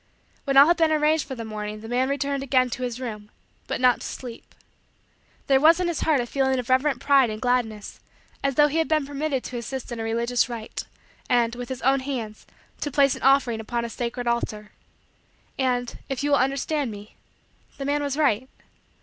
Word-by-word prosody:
When 275 -1 +1
all 275 - +10
had 345 +2 +3
been 325 -2 +3
arranged 310 0 +2
for 265 - -5
the 230 -2 -6
morning, 210 -1 -6
the 225 - -9
man 250 +3 0
returned 280 0 -1
again 255 -2 +2
to 255 - -5
his 245 -1 -3
room; 210 -4 -6 0.4
but - - -2
not 250 -1 +4
to - - -5
sleep. 245 -3 -9 0.9
There 270 -1 +4
was 325 +4 +6
in 360 - 0
his 340 -3 -2
heart 310 -4 +2
a 240 - -1
feeling 265 +1 0
of 250 0 -4
reverent 270 +2 +2
pride 275 -4 +4
and 215 0 -5
gladness, 225 -4 -1 0.4
as 275 -1 0
though 295 +1 +6
he 305 +3 -1
had 320 - +1
been 310 -3 +1
permitted 285 -1 -2
to 250 - -6
assist 250 +2 -6
in 235 - -5
a - - -2
religious 235 +2 0
rite, 230 -2 -6 0.4
and, 235 -1 +2
with 245 0 -7
his 260 -2 -6
own 270 +1 +4
hands, 245 -6 -5 0.3
to 290 - -2
place 275 -1 +3
an - - -10
offering 270 -4 +3
upon 235 +2 -3
a - - -5
sacred 245 +1 -4
altar. 215 -3 -2 0.9
And, 245 -2 -1
if 270 0 -3
you 290 - 0
will 285 - +5
understand 275 +1 0
me, 205 0 -10 0.6
the 275 - -5
man 290 +1 0
was 285 -1 -2
right. 260 -4 +1
260 Hz, 210 wpm, -24 LUFS, 235-280 Hz, 0.9 s, all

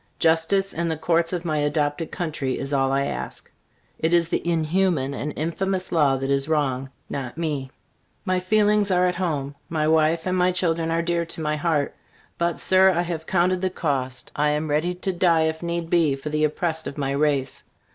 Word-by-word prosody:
Justice 165 +5 +2
in 170 0 -1
the 160 - -1
Courts 165 +1 +1
of 175 -1 -3
my 155 -2 0
adopted 145 +2 0
country 150 -6 -2
is 135 +1 -4
all 135 -1 +2
I 140 0 +1
ask. 65 - -6 0.5
It 160 +2 +1
is 170 -1 +4
the - - 0
inhuman 165 -3 +1
and 145 +2 -3
infamous 185 +4 -2
law 145 -5 +3
that 135 +1 -2
is 140 +2 0
wrong, 135 -4 0 0.2
not 135 0 -5
me. 150 -5 -2 0.6
My 185 -1 +1
feelings 210 +2 +2
are 180 -1 +3
at 180 0 -1
my 185 - +1
home. 140 -4 -3
My 155 -2 0
wife 160 +1 +3
and 185 0 0
my 180 0 +3
children 165 -2 0
are 165 +1 +1
dear 170 0 0
to 165 - -5
my 150 -1 0
heart. 150 -2 0 0.4
But, 170 0 0
Sir, 190 0 +5
I 175 -2 +1
have 165 -2 -5
counted 180 0 +2
the 190 - +1
cost. 135 -7 -3
I 150 +1 +2
am 150 +1 -1
ready 165 +5 +1
to 185 +1 -2
die, 170 -3 +3
if 160 0 -1
need 170 -1 -2
be, 160 -5 +3
for 135 +3 -6
the 155 0 +1
oppressed 160 +1 -2
of 140 - -7
my 135 -2 -1
race. 140 -1 0
160 Hz, 205 wpm, -24 LUFS, 145-175 Hz, 0.6 s, Sir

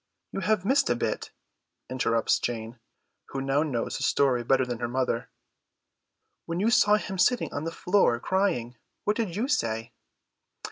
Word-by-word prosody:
"You - - -3
have 200 0 +1
missed 270 +6 +3
a 120 - +3
bit," - - -2 0.6
interrupts 115 -3 +1
Jane, 115 0 -4 0.5
who 135 - -5
now 135 +2 +1
knows 135 -7 -2
the - - -4
story 130 -4 +2
better 130 +2 +3
than 120 -2 -4
her 120 - -1
mother. 125 -1 -1 1.2
"When 170 +1 -2
you 220 +4 +2
saw 210 -3 +5
him 195 -3 -4
sitting 245 +7 +2
on 145 +2 -3
the 165 - -2
floor 180 -10 +2
crying, 125 -10 0 0.3
what 210 - +1
did 210 -7 -2
you 225 +6 -1
say?" 115 - -1
135 Hz, 160 wpm, -27 LUFS, 120-200 Hz, 1.2 s, saw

